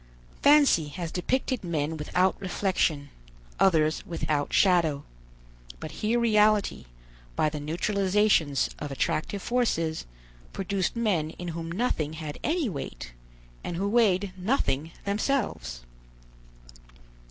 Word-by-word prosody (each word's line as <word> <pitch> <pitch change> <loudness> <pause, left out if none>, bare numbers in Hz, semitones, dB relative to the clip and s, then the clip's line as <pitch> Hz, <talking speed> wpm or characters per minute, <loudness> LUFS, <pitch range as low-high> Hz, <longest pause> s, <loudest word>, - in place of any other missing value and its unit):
Fancy 285 - +5
has 165 +2 -5
depicted 255 +6 -1
men 160 -2 -1
without 180 +5 +1
reflection, 175 -6 0 0.5
others 160 -5 +3
without 155 -4 -2
shadow. 165 -7 +3 0.8
But - - -7
here 225 +3 +2
reality, 215 -2 +3 0.5
by 155 - +2
the 150 0 -5
neutralizations 185 -1 +1
of 145 - -5
attractive 155 +7 -2
forces, 165 - 0 0.5
produced 195 +1 -1
men 200 -10 0
in 175 +2 -7
whom 165 0 -5
nothing 170 -7 -1
had 155 -2 -6
any 320 -2 +1
weight, 140 - -6 0.5
and 170 - -4
who 195 +3 0
weighed 200 -4 +2
nothing 180 - 0 0.2
themselves. 200 - -1
180 Hz, 110 wpm, -27 LUFS, 155-210 Hz, 0.8 s, Fancy